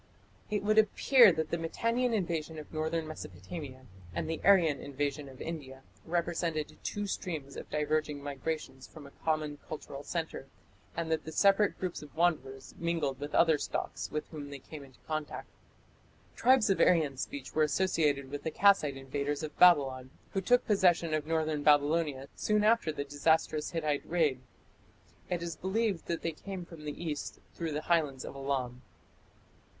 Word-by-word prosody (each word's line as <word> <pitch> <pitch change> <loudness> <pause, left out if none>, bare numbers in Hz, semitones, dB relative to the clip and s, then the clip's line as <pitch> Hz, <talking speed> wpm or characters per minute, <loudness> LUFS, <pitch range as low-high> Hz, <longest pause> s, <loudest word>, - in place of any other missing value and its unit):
It 210 -1 -1
would 215 +1 +4
appear 230 +1 +6
that 160 -2 -2
the 170 - 0
Mitannian 230 +9 0
invasion 165 -6 -2
of 155 - -9
northern 160 +1 -1
Mesopotamia 130 - -8 0.3
and - - -2
the 160 0 -3
Aryan 175 -7 +5
invasion 140 0 -3
of 130 -1 -13
India 135 -5 -6 0.2
represented 170 -2 -1
two 205 0 -3
streams 155 -8 -4
of - - -8
diverging 150 -1 -1
migrations 145 -1 -4
from 155 -3 -12
a 140 - -12
common 155 -2 -1
cultural 140 -2 -6
centre, 160 -2 -4 0.5
and 165 -1 -2
that 160 - 0
the 160 - -6
separate 200 +5 +4
groups 185 -2 -3
of 150 -2 -13
wanderers 135 -6 0
mingled 165 -6 -1
with 145 +1 -4
other 160 -3 +5
stocks - - -3
with 150 0 -3
whom 145 -3 -7
they 140 - -6
came 145 +2 -10
into 130 -3 -17
contact. 155 -1 -4 0.9
Tribes 255 -5 +4
of 195 - +1
Aryan 155 -6 +4
speech 135 +1 -6
were 155 - +2
associated 150 -4 +1
with 145 - -4
the - - -2
Kassite 160 -7 +4
invaders 140 +3 -3
of 155 - -5
Babylon, 135 -7 +5 0.2
who 195 - -1
took 245 +5 +3
possession 175 -5 +3
of 155 -1 -1
northern 155 -2 0
Babylonia 145 -1 +3
soon 210 -1 +1
after 220 -6 +3
the 145 -2 -3
disastrous 150 +2 +1
Hittite 155 -4 -2
raid. 155 -7 +2 0.9
It 175 -1 -1
is 170 -2 -4
believed 195 -1 -1
that 170 - -2
they 165 - 0
came 185 +3 -7
from 165 -3 -11
the 150 +3 -5
east 150 -3 -4
through 165 -3 -3
the 150 - -2
highlands 150 -7 +1
of - - -8
Elam. 130 -3 -2
155 Hz, 165 wpm, -31 LUFS, 145-170 Hz, 0.9 s, appear